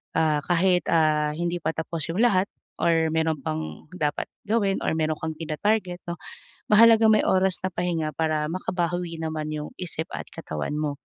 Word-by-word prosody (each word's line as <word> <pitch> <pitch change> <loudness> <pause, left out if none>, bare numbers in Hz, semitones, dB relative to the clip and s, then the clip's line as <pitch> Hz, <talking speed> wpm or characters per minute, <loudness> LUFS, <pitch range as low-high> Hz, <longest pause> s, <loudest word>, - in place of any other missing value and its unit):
Ah, 155 -2 +3
kahit, 180 +1 +2
ah, 150 -2 +3
hindi 175 +1 -2
pa 160 0 -1
tapos 160 -1 -3
'yung 170 +5 -3
lahat 200 -4 +3 0.3
or 165 -1 +3
meron 160 -1 +1
pang 80 -4 -4
dapat 150 -3 -1 0.2
gawin 205 -4 +1
or - - 0
meron 155 0 +1
kang 160 0 -2
tina-target 180 +3 -1
'no. 170 - -4 0.5
Mahalagang 225 0 +7
may 215 - +3
oras 190 0 +3
na 185 - 0
pahinga 165 -3 -1
para 155 -2 0
makabawi 175 -1 -2
naman 155 -1 -3
'yung 150 0 -5
isip 165 -3 -4
at - - -5
katawan 75 - -4
mo. 150 -1 0
165 Hz, 170 wpm, -25 LUFS, 155-180 Hz, 0.5 s, Mahalagang